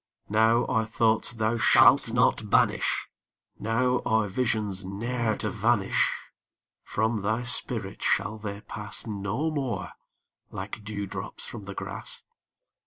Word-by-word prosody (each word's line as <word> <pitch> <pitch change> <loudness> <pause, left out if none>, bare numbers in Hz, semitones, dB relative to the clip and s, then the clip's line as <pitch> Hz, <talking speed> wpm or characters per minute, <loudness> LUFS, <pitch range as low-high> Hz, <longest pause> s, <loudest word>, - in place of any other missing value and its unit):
Now 110 +3 +4
are 110 -2 0
thoughts 110 0 +2
thou 110 0 0
shalt - - +6
not - - +2
banish - - +2 0.5
Now 125 +3 +1
are 110 -2 +2
visions 105 -3 -1
ne'er 110 +4 -1
to - - -2
vanish 110 -3 +2 0.7
From 110 0 0
thy 110 +4 0
spirit 120 -5 -1
shall 110 0 +1
they 100 -1 -6
pass 105 0 -4
No 105 +8 -2
more 130 -10 -3 0.6
like 100 +3 -6
dew 105 -1 -4
drops - - -6
from 100 - -7
the 100 0 -7
grass. 485 -1 -5
110 Hz, 125 wpm, -27 LUFS, 105-120 Hz, 0.7 s, shalt